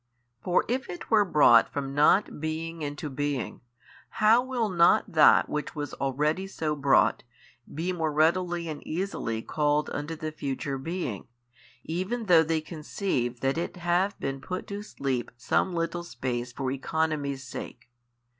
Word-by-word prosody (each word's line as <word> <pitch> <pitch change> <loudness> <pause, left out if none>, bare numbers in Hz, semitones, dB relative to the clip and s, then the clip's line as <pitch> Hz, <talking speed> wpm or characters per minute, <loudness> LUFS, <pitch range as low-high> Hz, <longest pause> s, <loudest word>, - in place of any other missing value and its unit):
For 180 - +2
if 260 +3 -2
it 175 +5 -8
were 215 -2 +6
brought 145 - +5
from 135 -1 -4
not 150 +6 +3
being 160 +1 -4
into 145 +2 -4
being, 145 -1 -3 0.6
how 220 +3 +5
will 250 -3 -1
not 170 -3 +4
that 155 -2 +6
which 150 +3 -4
was 145 -2 -4
already 150 +7 -1
so 155 -5 -2
brought, 140 -1 +3 0.5
be 170 +5 -2
more 160 -3 -1
readily 170 +3 +1
and 155 -2 -5
easily 155 - -3
called 150 -1 0
unto 150 +3 -4
the 155 -1 -5
future 140 -2 -4
being, 150 - -4 0.6
even 190 +8 -3
though 175 -4 +6
they 160 0 0
conceive 155 - -2
5 120 - -26
that 135 +4 +1
it 170 - -4
have 180 +3 0
been 135 0 -3
put 185 +4 -5
to 200 0 -4
sleep 135 - -3
some 155 +9 +1
little 170 0 -2
space 125 -7 -4
for 130 +1 -3
economy's 140 0 -1
sake? 120 -1 -9
155 Hz, 155 wpm, -27 LUFS, 140-175 Hz, 0.6 s, were